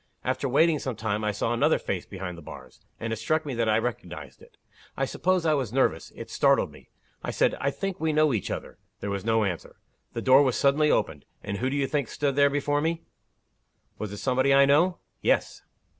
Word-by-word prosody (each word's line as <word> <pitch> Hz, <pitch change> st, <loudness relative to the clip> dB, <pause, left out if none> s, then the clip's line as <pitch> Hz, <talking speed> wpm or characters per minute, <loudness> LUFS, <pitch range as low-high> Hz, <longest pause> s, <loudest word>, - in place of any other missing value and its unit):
After 140 Hz, -, -1 dB
waiting 155 Hz, +4 st, +3 dB
some 130 Hz, -3 st, -4 dB
time, 110 Hz, -1 st, -2 dB
I 105 Hz, -, +1 dB
saw 110 Hz, +3 st, -1 dB
another 120 Hz, -, +3 dB
face -, -, -4 dB
behind 95 Hz, -2 st, -6 dB
the 85 Hz, -, -11 dB
bars -, -, -12 dB, 0.2 s
and 115 Hz, 0 st, -3 dB
it -, -, -3 dB
struck 155 Hz, +8 st, 0 dB
me 140 Hz, -, -3 dB
that 115 Hz, -2 st, 0 dB
I 110 Hz, -, +4 dB
recognized 90 Hz, -, -5 dB
it. -, -, -19 dB, 0.4 s
I 135 Hz, -, +1 dB
suppose 180 Hz, +5 st, 0 dB
I 155 Hz, -, +4 dB
was 130 Hz, -7 st, -1 dB
nervous. 120 Hz, -11 st, 0 dB
It -, -, -9 dB
startled -, -, +3 dB
me. -, -, -17 dB, 0.3 s
I -, -, -3 dB
said, -, -, +2 dB
'I 140 Hz, -, +2 dB
think 195 Hz, +5 st, -4 dB
we 160 Hz, 0 st, +1 dB
know 155 Hz, -2 st, +3 dB
each 105 Hz, -, -2 dB
other.' -, -, -6 dB, 0.2 s
There 100 Hz, -, -4 dB
was 100 Hz, -1 st, -3 dB
no 115 Hz, 0 st, +2 dB
answer. 90 Hz, -5 st, -4 dB, 0.4 s
The -, -, -4 dB
door 130 Hz, +2 st, +7 dB
was 130 Hz, -4 st, +2 dB
suddenly 145 Hz, +2 st, +3 dB
opened 75 Hz, -, 0 dB, 0.2 s
and 100 Hz, -1 st, -3 dB
who 130 Hz, +5 st, -1 dB
do 135 Hz, -, -2 dB
you 140 Hz, -1 st, +1 dB
think 140 Hz, -2 st, -1 dB
stood 140 Hz, +3 st, -1 dB, 0.2 s
before 145 Hz, +1 st, 0 dB
me?" 165 Hz, +1 st, -1 dB, 1.0 s
"Was 105 Hz, -2 st, -4 dB
it 105 Hz, -, -6 dB
somebody 130 Hz, +3 st, +1 dB
I 140 Hz, 0 st, +7 dB
know?" 170 Hz, +6 st, +3 dB, 0.2 s
"Yes." -, -, +1 dB
130 Hz, 220 wpm, -26 LUFS, 105-145 Hz, 1.0 s, door